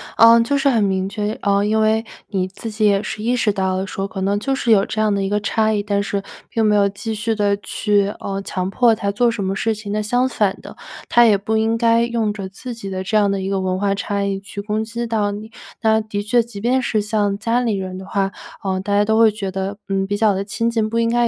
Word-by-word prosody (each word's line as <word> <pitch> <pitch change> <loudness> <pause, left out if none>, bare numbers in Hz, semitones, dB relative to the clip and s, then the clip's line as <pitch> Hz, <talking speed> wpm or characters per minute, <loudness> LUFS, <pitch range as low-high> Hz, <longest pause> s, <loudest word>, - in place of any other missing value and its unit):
嗯， 230 +1 +7
就 280 +5 +1
是 275 0 +3
很 230 -4 +2
明 190 -1 0
确 210 0 -2
呃， 200 0 +2
因 220 +1 +2
为 220 +1 +2 0.2
你 190 -3 -1
自 205 +4 -7
己 215 0 0
也 200 0 +3
是 210 - -5
意 240 +3 +1
识 225 -3 +2
到 190 -2 -1
了 190 +1 -2
说 195 +1 -4
可 190 - -6
能 200 +1 +1
就 270 +5 -1
是 240 -3 0
有 200 -2 +5
这 215 - -2
样 215 -1 +2
的 200 - 0
一 195 - -1
个 205 +1 0
差 220 +1 +1
异， 205 -1 0
但 200 -1 0
是 200 -1 -2 0.3
并 225 -1 0
没 210 -1 +4
有 200 0 +4
继 210 +3 -4
续 220 +1 -1
地 205 -1 +1
去， 205 0 0
呃， 195 0 -3
强 185 -1 -3
迫 230 +1 +3
他 200 -2 -2
做 240 +4 +2
什 225 -3 -3
么 190 0 -1
事 220 +2 0
情。 205 -1 -7
那 210 +1 0
相 245 +4 +1
反 210 -5 0
的， - - -11 0.3
他 240 0 +6
也 210 -3 +5
不 220 +3 -1
应 225 +1 +1
该 230 0 +3
用 230 -3 -1
着 200 -2 -6
自 235 +6 -8
己 210 -4 -7
的 190 -1 -4
这 215 +3 +1
样 205 -1 +3
的 195 -1 -1
一 190 - -3
个 195 -1 0
文 185 0 -1
化 200 +1 +1
差 200 0 -2
异 195 -1 -1
去 200 +1 -7
攻 210 +1 -2
击 235 +1 -4
到 215 -3 0
你。 215 +2 -8 0.3
那 220 0 +3
的 210 -2 -4
确， 235 +3 +3
即 225 -3 -9
便 255 +3 +2
是 220 -3 0
像 205 -2 0
家 230 +3 0
里 230 -4 0
人 185 -1 -4
的 190 - -8
话， 195 0 -1 0.3
呃， 190 -1 -1
大 200 +2 -1
家 205 - +4
都 220 +1 +1
会 225 - +7
觉 205 -2 -4
得， 195 +1 -3
嗯， 195 0 0
比 205 - -1
较 210 -1 +3
地 195 +1 -3
亲 230 +3 -1
近， 225 -2 0
不 230 - -2
应 230 0 +2
该 240 0 +2
210 Hz, 295 characters per minute, -20 LUFS, 195-225 Hz, 0.3 s, 嗯